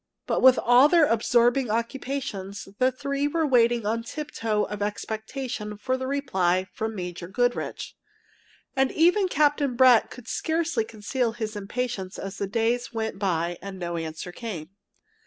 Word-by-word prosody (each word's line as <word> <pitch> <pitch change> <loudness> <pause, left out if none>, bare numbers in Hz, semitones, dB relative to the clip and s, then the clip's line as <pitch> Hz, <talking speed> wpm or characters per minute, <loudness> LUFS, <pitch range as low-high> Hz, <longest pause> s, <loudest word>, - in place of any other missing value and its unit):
But - - 0
with 260 -1 +7
all 245 +4 +6
their 335 -2 +6
absorbing 240 +1 +2
occupations, 230 -4 -3
the 255 0 +4
three 280 +2 -2
were 320 +2 0
waiting 240 -4 +3
on 225 +2 0
tiptoe 230 -5 -2
of 210 -1 -5
expectation 220 +1 -4
for 255 +5 -2
a 260 0 -2
reply 190 -10 +1
from 220 0 -3
Major 180 -2 -5
Goodrich. 245 +5 -2 0.8
And 265 0 +2
even 360 +5 +4
Captain 290 -5 +2
Brett 250 -2 +6
could 250 -2 -12
scarcely 320 -8 -1
conceal 225 +2 -2
his 220 -2 -4
impatience 205 -2 -4
as 195 0 -6
the 200 - -1
days 230 +3 0
went 220 -1 -3
by 175 -3 -1
and 195 -1 -7
no 175 -1 -4
answer 165 +1 -5
came. 175 -5 -7
230 Hz, 150 wpm, -26 LUFS, 205-260 Hz, 0.8 s, with